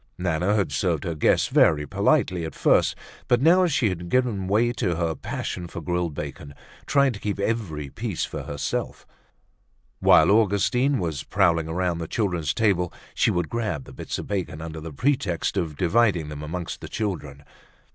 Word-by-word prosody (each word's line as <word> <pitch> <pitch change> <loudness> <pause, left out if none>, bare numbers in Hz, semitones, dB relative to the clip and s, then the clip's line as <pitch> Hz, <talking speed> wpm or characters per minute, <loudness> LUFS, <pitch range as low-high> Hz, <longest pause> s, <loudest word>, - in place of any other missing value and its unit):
Nana 90 +3 0
had 100 -8 0
served 70 - 0
her 85 - -2
guests 75 - +2
very 75 -1 +4
politely 85 +4 +1
at 80 - -6
first, - - +3 0.3
but 120 - +3
now 175 +6 +5
she 135 -8 +2
had 90 -2 -5
given 115 -6 +1
way 110 +5 +2
to 100 -8 -1
her 85 -1 0
passion 85 +2 -5
for 85 - -7
grilled 85 -1 -2
bacon, 70 -1 -7 0.3
trying 140 -2 +3
to 100 - -8
keep 105 -1 -3
every 100 -10 -2
piece 105 - -3
for - - -6
herself. 70 -1 -4 0.9
While - - +6
Augustine 115 +6 +3
was 80 -6 -2
prowling 85 -2 +2
around 85 +1 -1
the 80 - -4
children's 90 - -1
table, 95 -6 +1 0.2
she - - +2
would 90 -2 0
grab 105 - -2
the - - -13
bits - - -5
of - - -5
bacon 95 -6 -3
under 80 -1 -7
the 80 +1 -7
pretext 115 - 0
of 85 -6 -2
dividing 90 -3 +2
them 75 -1 -7
amongst 85 +3 -5
the - - -8
children. 75 -10 -4
90 Hz, 175 wpm, -24 LUFS, 80-110 Hz, 0.9 s, While